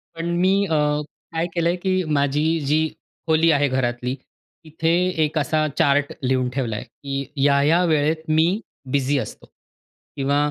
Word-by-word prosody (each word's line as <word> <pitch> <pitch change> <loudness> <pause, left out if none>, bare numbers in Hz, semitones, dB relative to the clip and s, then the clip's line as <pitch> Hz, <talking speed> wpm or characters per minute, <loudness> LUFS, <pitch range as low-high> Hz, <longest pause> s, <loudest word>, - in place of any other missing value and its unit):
पण 165 +1 -4
मी 190 +1 +4
अ, 165 - -2 0.6
काय 165 +1 0
केलं 170 -1 +1
आहे 175 - +1
की 185 0 0
माझी 150 +4 +1
जी 155 +3 +2 0.4
खोली 160 +1 +4
आहे 145 -1 +3
घरातली, 125 -1 -1 0.5
तिथे 160 +1 -1 0.3
एक 155 +1 -1
असा 155 +1 +1
चार्ट 145 0 +2
लिहून 130 -1 +1
ठेवला 125 -4 -2
आहे, 105 - -5
की 135 +3 -5
ह्या-ह्या 145 +5 +3
वेळेत 155 0 +1
मी 155 +1 +4 0.5
बिझी 140 +1 +1
असतो. - - -7 0.7
किंवा 140 +1 0
145 Hz, 150 wpm, -22 LUFS, 135-160 Hz, 0.7 s, मी